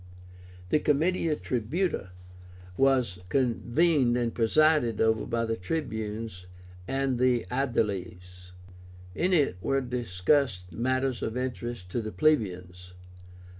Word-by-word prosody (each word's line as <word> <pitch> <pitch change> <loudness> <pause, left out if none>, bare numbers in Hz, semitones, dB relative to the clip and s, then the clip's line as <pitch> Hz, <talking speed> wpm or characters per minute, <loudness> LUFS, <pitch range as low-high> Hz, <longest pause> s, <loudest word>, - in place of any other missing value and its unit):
The 150 - +3
Comitia 155 +2 +1
Tribúta 130 - -2 0.7
was 130 -8 +2
convened 130 - +2
and 120 -2 -1
presided 120 0 +3
over 110 0 +2
by 115 -1 0
the 115 0 -1
Tribunes 110 - -4 0.4
and 135 -2 -1
Aediles. 105 -8 -1 0.6
In 180 - 0
it 145 - +2
were 135 +7 +1
discussed 120 -4 0
matters 130 +4 -1
of 110 +2 -3
interest 120 -7 -4
to 120 - -1
the 110 -1 -5
plebeians. 90 - 0
120 Hz, 100 wpm, -28 LUFS, 105-135 Hz, 0.7 s, The